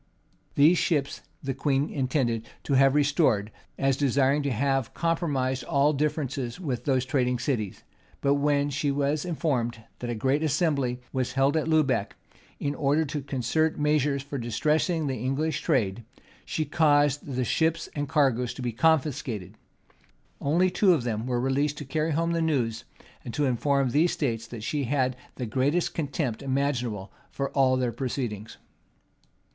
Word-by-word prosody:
These 155 +5 +5
ships 145 -5 0 0.2
the 135 -1 -2
queen 140 +1 0
intended 125 -4 -1 0.2
to 140 - -1
have 135 +1 +5
restored, 140 -8 +2 0.3
as 135 -1 +2
desiring 140 +1 +2
to 140 - -1
have 135 +1 0
compromised 140 -7 0
all 145 +2 +3
differences 140 -3 -2
with 130 -9 -3
those 130 -2 +1
trading 125 -2 +1
cities; 120 -6 -2 0.4
but 140 - +2
when 145 0 +1
she 140 +1 -1
was 145 +2 0
informed, 125 -9 -1 0.2
that 120 - -4
a 120 - -2
general 130 +6 +1
assembly 140 -5 0
was 130 -1 -1
held 135 +3 +2
at 160 0 0
Lubec, 150 -10 +1 0.4
in 145 - -1
order 145 +2 +1
to 145 0 -4
concert 140 +4 0
measures 150 -2 +1
for 140 -1 -5
distressing 150 +8 0
the 135 -2 -2
English 140 +5 -1
trade, 115 - 0 0.4
she 155 - -2
caused 145 -3 +2
the 130 -1 0
ships 160 +4 +1
and 145 -2 -3
cargoes 130 -5 +1
to 130 - -6
be 120 - -1
confiscated: 130 - 0 0.9
only 175 +6 +2
two 185 -1 +4
of 135 - -2
them 115 0 -2
were 125 -1 0
released 140 +3 0
to 145 - -6
carry 155 +4 -1
home 165 +2 0
the 165 0 0
news, 130 -9 0 0.4
and 120 - -6
to 145 - +1
inform 135 +1 +1
these 160 +6 +3
states, 115 -6 -2
that 115 -2 -8
she 145 +3 -1
had 130 0 0 0.2
the 125 - -4
greatest 135 +9 0
contempt 140 -6 -2
imaginable 130 -7 -1 0.2
for 140 0 -3
all 130 -2 +3
their 125 -2 0
proceedings. 115 -3 -4
140 Hz, 160 wpm, -27 LUFS, 125-150 Hz, 0.9 s, These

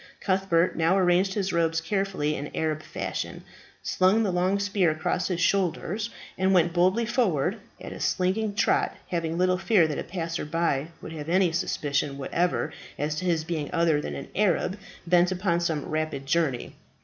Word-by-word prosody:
Cuthbert 185 -3 +1
now 165 +3 +3
arranged 185 +1 +3
his 195 -2 -1
robes 165 -1 +2
carefully 185 -4 -1
in 145 0 -5
Arab 155 -1 -1
fashion, - - -5 0.4
slung 190 +5 +3
the 200 - 0
long 180 +2 +1
spear 200 -3 +1
across 155 +3 -1
his 180 -3 -2
shoulders, 195 +4 0 0.3
and 190 0 +3
went 170 -1 +3
boldly 185 +6 +3
forward 200 - +1 0.2
at - - -7
a - - -9
slinging 200 +3 0
trot, - - +2
having 165 -1 -2
little 185 0 +2
fear 190 -2 +4
that 150 - -3
a - - -3
passer 165 -2 -4
by 155 -2 0 0.2
would - - -7
have 155 0 -6
any 180 0 +3
suspicion 145 -3 -1
whatever 170 +6 -1 0.2
as 150 +2 -1
to 185 - -3
his 165 -3 +1
being 160 -3 -3
other 165 -4 +2
than - - -5
an 140 - -7
Arab 190 -2 +1 0.3
bent 175 +1 +4
upon 180 -2 0
some 160 -4 -1
rapid 155 -3 -3
journey. 145 -4 0
175 Hz, 175 wpm, -26 LUFS, 160-190 Hz, 0.4 s, fear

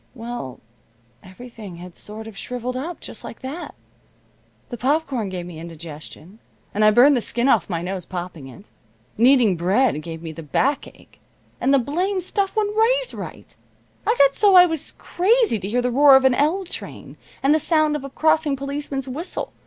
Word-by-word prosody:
Well, 230 - -7 0.6
everything 210 -1 -11
had 175 0 -11
sort 215 +1 -9
of 220 -2 -10
shriveled 250 +3 -5
up 315 +7 -5
just - - -8
like - - -9
that. 285 +7 -7 0.9
The 240 - -6
popcorn 265 -4 0
gave 180 -2 -5
me 170 -3 -9
indigestion, 165 +3 -10 0.3
and 210 - +1
I 215 - +7
burned 250 +7 +6
the 245 - +1
skin 240 +3 0
off 215 -10 +3
my 170 -2 -2
nose 185 -1 -4
popping 175 -6 -6
it. 165 - -14 0.4
Kneading 235 -5 +4
bread 190 - +2
gave 165 +1 -8
me 165 - -5
the 165 - -9
backache, 265 - -2 0.4
and 270 - +1
the 280 - +6
blamed 360 - -1
stuff 390 +2 -2
wouldn't 420 -1 0
raise - - +2
right. - - -9 0.5
I 450 - +3
got 275 0 +5
so 405 +2 +4
I 360 0 +10
was 320 -3 -3
crazy 420 - +1
to 195 +1 -5
hear 245 +3 0
the 250 - 0
roar 280 +2 +7
of 265 0 +4
an 260 - +5
L 315 +9 +1
train, 360 - -8 0.3
and 275 +2 +4
the 310 - +3
sound 310 -1 +2
of 295 - -4
a 275 - -6
crossing 315 0 +2
policeman's 275 0 -4
whistle. 300 +8 -5
255 Hz, 185 wpm, -22 LUFS, 190-310 Hz, 0.9 s, I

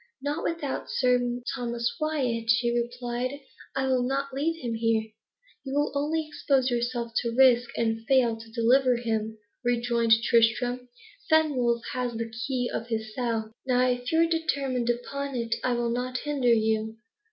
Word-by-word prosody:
"Not 290 +4 -3
without 320 -5 -3
Sir 245 -1 +1
Thomas 235 -2 -2
Wyat," 255 -7 -1
she 235 +1 +3
replied; 245 +2 -2 0.4
"I 270 0 0
will 260 -1 +2
not 270 +2 -1
leave 325 +5 -1
him 235 -2 -2
here." 225 -1 0 0.5
"You 270 0 -4
will 290 0 +1
only 305 +2 -1
expose 270 -4 +1
yourself 240 -1 -1
to 235 -1 -1
risk, 245 -2 +5
and 225 -1 0
fail 255 -4 +4
to 225 0 -12
deliver 250 +2 +3
him," 220 -2 -2 0.3
rejoined 235 -1 +2
Tristram. 245 +2 +2 0.4
"Fenwolf 260 -7 +3
has 250 -1 -2
the 230 0 -4
key 245 +2 -2
of 230 - -3
his 220 -2 -3
cell. 225 -3 -2 0.2
Nay, 250 -1 +3
if 245 0 -6
you 325 0 +4
are - - +2
determined 275 -7 -1
upon 275 +3 -3
it, 230 -1 -1
I 255 - +1
will 240 -1 0
not 250 +1 -2
hinder 275 -4 +1
you. 220 0 +1
245 Hz, 160 wpm, -27 LUFS, 235-265 Hz, 0.5 s, risk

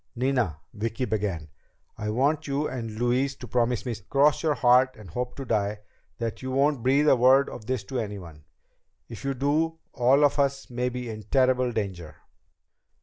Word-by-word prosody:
"Nina," 125 - 0
Vicki 115 +4 -2
began, 100 -8 -2 0.5
"I 105 -1 -4
want 145 +7 +1
you 140 +2 -1
and 120 -3 -5
Louise 125 +4 +1
to 125 - -10
promise 120 +1 0
me 120 - -2 0.2
cross 145 +2 +3
your 155 -3 +1
heart 130 +1 +4
and 105 -6 -12
hope 125 +5 -4
to 135 - -6
die 105 -2 -1 0.4
that 115 -2 -4
you 130 - -5
won't 135 0 +1
breathe 140 +5 +3
a 135 - +7
word 130 +3 +5
of 110 -3 -9
this 130 -3 -1
to 130 -2 -4
anyone. 95 -8 -7 0.7
If 115 +1 -9
you 135 0 -1
do, 155 +5 0 0.2
all 130 +3 +4
of 145 - +1
us 140 -1 0
may 125 +1 -1
be 125 0 -5
in 110 -1 -6
terrible 130 -2 +3
danger." 95 -8 -4
125 Hz, 180 wpm, -26 LUFS, 110-135 Hz, 0.7 s, a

